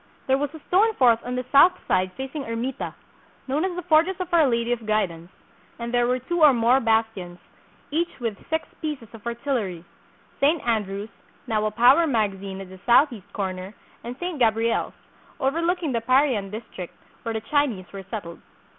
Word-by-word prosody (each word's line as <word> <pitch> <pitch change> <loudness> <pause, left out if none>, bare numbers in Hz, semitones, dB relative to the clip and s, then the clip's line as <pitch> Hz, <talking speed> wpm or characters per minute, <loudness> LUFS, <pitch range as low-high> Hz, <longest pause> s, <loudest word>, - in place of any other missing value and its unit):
There 265 0 +2
was 290 -1 -2
a - - -9
stone 430 +4 +3
fort 235 -3 +4
on 250 0 -4
the 250 0 -3
south 315 +6 +7
side 185 0 +1
facing 270 +2 -5
Ermita, 230 +3 -4 0.5
known 285 +5 0
as 375 -2 -1
the 360 - -4
Fortress 335 +3 +3
of 360 -2 -5
Our 325 -4 +5
Lady 235 -1 0
of 230 -3 -2
Guidance; 180 -6 -1 0.5
and 235 0 -5
there 240 0 +3
were 250 +1 +2
two 335 +7 -3
or 300 -3 +8
more 240 +2 +4
bastions, 220 -7 0 0.5
each 340 +2 -1
with 230 -4 -2
six 320 0 -1
pieces 295 -8 -4
of 225 0 -10
artillery, 235 - -2 0.6
St. 305 +4 +4
Andrew's, 210 -2 -1 0.4
now 215 -1 0
a - - +1
powder 250 +9 +5
mag 220 -7 +1
azine 195 0 -7
at 190 - -9
the 190 0 -12
southeast 240 -4 +3
corner, 190 0 -4 0.3
and 245 +2 -6
St. 350 -4 -4
Gabriel's, 230 -1 +1 0.5
over 275 +5 0
looking 340 -3 0
the 230 -2 0
Parian 255 -4 +2
district, 210 -4 -8 0.3
where 230 - -3
the 220 - -3
Chinese 250 -7 0
were 195 - -6
settled. 175 -6 -6
240 Hz, 180 wpm, -24 LUFS, 215-285 Hz, 0.6 s, or